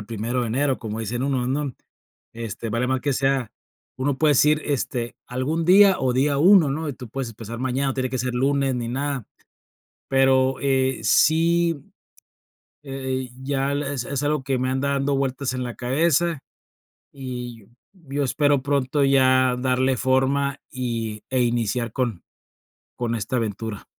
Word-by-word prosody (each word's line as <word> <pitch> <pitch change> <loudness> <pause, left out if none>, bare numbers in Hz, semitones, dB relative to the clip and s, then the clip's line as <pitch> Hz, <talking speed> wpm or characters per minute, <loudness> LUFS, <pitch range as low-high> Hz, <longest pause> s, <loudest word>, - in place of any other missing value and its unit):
el 105 - -10
primero 115 +3 -2
de - - -1
enero, 135 +3 0
como 110 -1 -5
dicen 120 +3 -3
unos, 130 -3 0
¿no?, 140 -1 -2 0.6
este, 115 0 -6
vale 120 +3 0
mal 130 0 0
que 140 +1 0
sea 135 -3 0 0.5
uno 135 0 -1
puede 155 -2 +4
decir, 150 +2 +4
este, 125 -4 -2
algún 145 +7 -2
día 195 +2 +7
o 130 -1 +1
día 140 +2 +1
1, 175 -2 +6
¿no?, 155 +2 -3
y 145 - -2
tú 125 -2 -10
puedes 130 -1 -4
empezar 115 +1 -8
mañana, 130 +2 -1
no 135 - -2
tiene 130 -1 -1
que 130 - -2
ser 125 +1 -2
lunes 135 +1 +1
ni 120 -1 -3
nada, 135 -1 -3 0.8
pero, 135 -1 +3
eh, 130 -2 +1
sí, 165 +7 +3 1.1
eh 130 -1 -3
eh, 125 - -13
ya 135 0 -1
es 140 -3 -2
es 140 0 -3
algo 145 -2 0
que 135 -1 0
me 130 0 0
anda 135 +2 0
dando 140 0 0
vueltas 135 -1 -1
en 130 - -3
la 120 -1 -5
cabeza 160 +4 +1 0.7
y 125 -5 -7 0.3
yo 145 -6 -4
espero 145 0 +2
pronto 140 0 +1
ya 130 -2 +4
darle 130 0 +1
forma 135 +1 +1
y 115 -4 -4
e 130 -1 +2
iniciar 120 -1 -1
con 120 -8 -2 0.8
con 120 -1 -2
esta 110 +4 -3
aventura. 110 -1 -4
130 Hz, 165 wpm, -23 LUFS, 125-140 Hz, 1.1 s, día